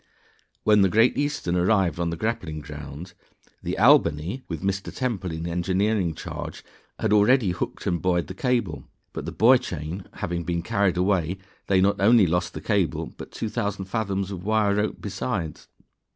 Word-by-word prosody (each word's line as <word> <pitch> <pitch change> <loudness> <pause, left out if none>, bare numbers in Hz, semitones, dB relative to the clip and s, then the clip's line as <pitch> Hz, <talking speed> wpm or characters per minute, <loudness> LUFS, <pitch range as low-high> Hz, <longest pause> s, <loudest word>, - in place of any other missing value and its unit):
_ - - -39 0.6
When 105 -1 +5
the 95 - +4
Great 115 +5 +4
Eastern 145 -12 -1
arrived 90 -3 +2
on 85 -1 0
the 85 - -4
grappling 110 -7 -2
ground, 75 +3 -9 0.5
the - - -3
Albany 80 - +4
(with 85 0 -5
Mr. 95 0 -2
Temple 110 -9 -2
in 80 +1 -5
engineering 90 +1 0
charge) - - -7 0.3
had - - +1
already 105 0 +4
hooked 90 - -4
and 85 - 0
buoyed 90 -2 +1
the - - -7
cable, 120 - -1 0.3
but - - -5
the - - -4
buoy 125 +3 +5
chain 85 +1 -6
having 85 0 -3
been 85 0 -2
carried 95 0 +1
away, 90 -1 +1 0.3
they 95 -1 +3
not 100 +1 +2
only 110 0 +6
lost 90 +2 -1
the - - -5
cable, 100 -6 0
but - - -10
2,000 105 -3 -3
fathoms 100 -2 -2
of 90 -2 -6
wire 105 -1 +2
rope 105 +1 0
besides. 95 -6 -4
95 Hz, 170 wpm, -25 LUFS, 85-105 Hz, 0.6 s, only